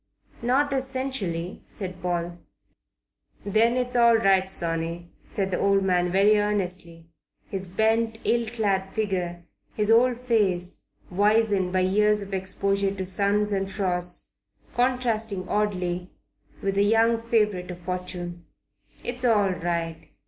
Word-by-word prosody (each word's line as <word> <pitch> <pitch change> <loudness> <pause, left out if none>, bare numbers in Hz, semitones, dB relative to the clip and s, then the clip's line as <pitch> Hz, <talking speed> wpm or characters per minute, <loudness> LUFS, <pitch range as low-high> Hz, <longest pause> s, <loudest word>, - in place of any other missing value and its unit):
"Not 275 +4 +2
essentially," 260 -10 -3
said 185 -3 -6
Paul. 175 -1 -2 1.1
"Then 225 +4 +3
it's 250 0 -2
all 235 -1 +6
right, 195 -3 +3
sonny," 170 -1 -2 0.2
said 195 -1 -2
the 180 - 0
old 195 0 +3
man 180 -2 +1
very 205 +3 +4
earnestly, 180 -5 -3 0.3
his 195 -1 -5
bent, 220 +4 +1
ill 235 -1 +2
clad 200 -4 -1
figure, 180 -5 -2 0.3
his 210 0 +1
old 240 +1 +4
face 195 -7 0 0.3
wizened 205 -1 +2
by 185 0 +2
years 210 +2 +2
of 200 0 -9
exposure 195 +1 0
to 190 -1 -4
suns 200 +3 +1
and 195 -1 -1
frosts, 180 -3 -2 0.4
contrasting 230 -6 0
oddly 180 -4 -1 0.5
with 195 - 0
the 200 +1 +3
young 225 +2 +3
favourite 210 -6 0
of 180 - -6
fortune. 175 -1 -5 0.6
"It's 245 +1 -3
all 210 -5 +3
right. 170 -2 -3
195 Hz, 125 wpm, -25 LUFS, 180-220 Hz, 1.1 s, all